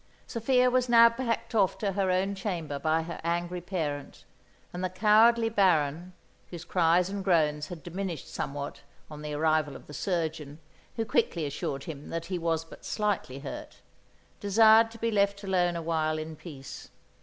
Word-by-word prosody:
Sophia 250 Hz, +2 st, +2 dB
was 255 Hz, 0 st, +1 dB
now 235 Hz, -1 st, +8 dB
packed 230 Hz, 0 st, -3 dB
off 195 Hz, -4 st, +2 dB
to 200 Hz, -2 st, -1 dB
her 195 Hz, -1 st, 0 dB
own 190 Hz, +2 st, +1 dB
chamber 170 Hz, -8 st, -4 dB
by 160 Hz, +2 st, +1 dB
her 170 Hz, +1 st, -7 dB
angry 175 Hz, +1 st, -2 dB
parent; 155 Hz, -6 st, -4 dB, 0.5 s
and 180 Hz, +1 st, -4 dB
the 185 Hz, -, 0 dB
cowardly 220 Hz, +4 st, +4 dB
Baron, 180 Hz, -5 st, +1 dB, 0.4 s
whose 175 Hz, -1 st, -8 dB
cries 175 Hz, 0 st, +3 dB
and 200 Hz, 0 st, -4 dB
groans 155 Hz, -5 st, +2 dB
had 175 Hz, -4 st, -9 dB
diminished 175 Hz, -3 st, -5 dB
somewhat 140 Hz, 0 st, -5 dB, 0.3 s
on 150 Hz, 0 st, -8 dB
the 150 Hz, -1 st, -4 dB
arrival 155 Hz, -1 st, +1 dB
of -, -, -11 dB
the 150 Hz, -, -12 dB
surgeon, 155 Hz, -3 st, -3 dB, 0.4 s
who 225 Hz, -, -1 dB
quickly 170 Hz, -6 st, 0 dB
assured 140 Hz, -1 st, -4 dB
him 150 Hz, -3 st, -8 dB
that 165 Hz, 0 st, -4 dB
he 180 Hz, 0 st, -3 dB
was 165 Hz, -1 st, -1 dB
but -, -, -14 dB
slightly 205 Hz, -, -2 dB
hurt, 135 Hz, -, -8 dB, 0.6 s
desired 220 Hz, +2 st, +6 dB
to 230 Hz, -, -12 dB
be 230 Hz, 0 st, -1 dB
left 200 Hz, -1 st, +1 dB
alone 180 Hz, -3 st, +1 dB
a 170 Hz, -, -4 dB
while 155 Hz, -1 st, 0 dB
in 155 Hz, 0 st, -6 dB
peace. 145 Hz, -4 st, -10 dB
175 Hz, 170 wpm, -28 LUFS, 155-200 Hz, 0.6 s, now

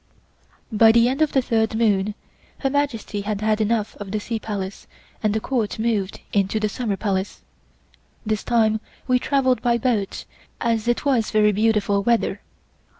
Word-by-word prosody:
By 225 Hz, +1 st, +6 dB
the 235 Hz, +1 st, +5 dB
end 265 Hz, +4 st, -1 dB
of 310 Hz, -, +3 dB
the 265 Hz, -, +3 dB
third 220 Hz, -2 st, +1 dB
moon 210 Hz, -2 st, +1 dB, 0.5 s
Her 270 Hz, -, 0 dB
Majesty 260 Hz, -8 st, -1 dB
had 205 Hz, 0 st, -3 dB
had 215 Hz, 0 st, +1 dB
enough 215 Hz, 0 st, 0 dB
of 205 Hz, -2 st, -7 dB
the 215 Hz, +2 st, -1 dB
Sea 225 Hz, +2 st, -4 dB
Palace 200 Hz, -3 st, -5 dB, 0.3 s
and 215 Hz, -, +1 dB
the 220 Hz, -, 0 dB
Court 230 Hz, -2 st, -2 dB
moved 220 Hz, -4 st, -1 dB
into 200 Hz, +1 st, +1 dB
the 215 Hz, -, +1 dB
Summer 210 Hz, -2 st, -2 dB
Palace. 195 Hz, -2 st, -2 dB, 0.8 s
This 215 Hz, -1 st, -1 dB
time 220 Hz, -2 st, +2 dB, 0.3 s
we 250 Hz, -1 st, +3 dB
travelled 260 Hz, -2 st, +1 dB
by 240 Hz, -1 st, +2 dB
boat 220 Hz, -5 st, -1 dB, 0.3 s
as 230 Hz, -1 st, 0 dB
it 240 Hz, +4 st, 0 dB
was 250 Hz, -6 st, +2 dB
very 210 Hz, -1 st, +4 dB
beautiful 205 Hz, -1 st, +2 dB
weather. 235 Hz, +2 st, +1 dB
220 Hz, 165 wpm, -22 LUFS, 205-235 Hz, 0.8 s, By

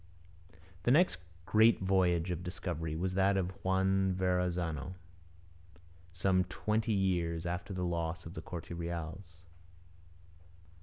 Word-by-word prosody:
The 100 Hz, -, 0 dB
next 165 Hz, +8 st, +4 dB, 0.3 s
great 110 Hz, +4 st, +5 dB
voyage 90 Hz, -2 st, +2 dB
of 90 Hz, 0 st, -3 dB
discovery 85 Hz, -3 st, -4 dB
was 90 Hz, +3 st, -1 dB
that 95 Hz, +1 st, +3 dB
of 95 Hz, -1 st, 0 dB
Juan 95 Hz, 0 st, +2 dB
Verrazano, 90 Hz, -3 st, -1 dB, 1.2 s
some 90 Hz, +1 st, +2 dB
twenty 110 Hz, +1 st, -1 dB
years 90 Hz, -4 st, 0 dB
after 90 Hz, +3 st, -3 dB
the 90 Hz, -1 st, -2 dB
loss 85 Hz, -1 st, -2 dB
of 85 Hz, -, -8 dB
the -, -, -6 dB
Corte 85 Hz, -2 st, -7 dB
Reals. 85 Hz, +1 st, -6 dB
90 Hz, 115 wpm, -33 LUFS, 85-95 Hz, 1.2 s, great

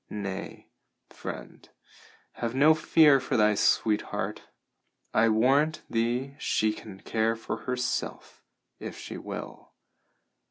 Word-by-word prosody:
Nay, 100 Hz, -2 st, -6 dB, 0.5 s
friend, -, -, -8 dB, 0.6 s
have 120 Hz, +1 st, -4 dB
no 150 Hz, +4 st, +6 dB
fear 155 Hz, -2 st, +5 dB
for 130 Hz, -, -1 dB
thy 105 Hz, -1 st, +4 dB
sweetheart. 105 Hz, +1 st, 0 dB, 0.7 s
I 115 Hz, +1 st, +4 dB
warrant 135 Hz, +8 st, +3 dB
thee 120 Hz, +4 st, 0 dB
she 110 Hz, 0 st, +1 dB
can 100 Hz, -3 st, -11 dB
care 115 Hz, 0 st, 0 dB
for 115 Hz, -, -5 dB
herself, 125 Hz, -1 st, -3 dB, 0.4 s
if -, -, -7 dB
she -, -, -7 dB
will. -, -, -8 dB
115 Hz, 110 wpm, -28 LUFS, 110-135 Hz, 0.7 s, no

